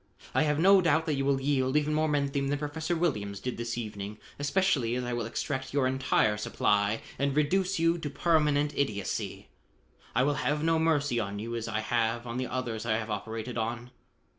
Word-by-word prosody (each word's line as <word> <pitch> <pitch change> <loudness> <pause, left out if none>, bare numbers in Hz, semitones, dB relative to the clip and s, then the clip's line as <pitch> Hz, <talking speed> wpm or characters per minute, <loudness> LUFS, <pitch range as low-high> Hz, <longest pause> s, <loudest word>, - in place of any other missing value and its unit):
I - - +3
have 150 -2 +2
no 190 +4 +6
doubt 160 -1 +2
that 155 - 0
you 135 -1 0
will 140 -1 +2
yield 135 0 +1
even 150 0 +1
more 155 +1 +2
menthium 140 -1 0
than 145 - +1
Professor 160 +3 -2
Williams 105 - -1
did 125 - -4
this 115 0 -3
evening 105 -2 -5 0.2
especially 145 -6 +1
as 125 - -2
I 120 0 -3
will 120 -2 -2
extract 130 +3 -3
your 140 -2 +3
entire 130 -5 +2
supply 105 0 +1 0.2
and 140 +1 0
reduce 185 +6 +2
you 165 +1 +2
to 150 - -4
permanent 150 -1 +2
idiocy. 105 -8 -2 0.7
I 125 - +4
will 145 +2 +2
have 150 +1 0
no 165 0 +3
mercy 145 -6 +2
on 100 -2 -3
you 115 +3 -4
as 115 -1 -3
I 110 -1 -1
have 115 +1 0
on 120 0 -4
the 130 0 -1
others 120 -4 -3
I 110 -2 +1
have 110 -1 -4
operated 110 +3 -4
on." 120 +2 -3
130 Hz, 200 wpm, -29 LUFS, 115-150 Hz, 0.7 s, no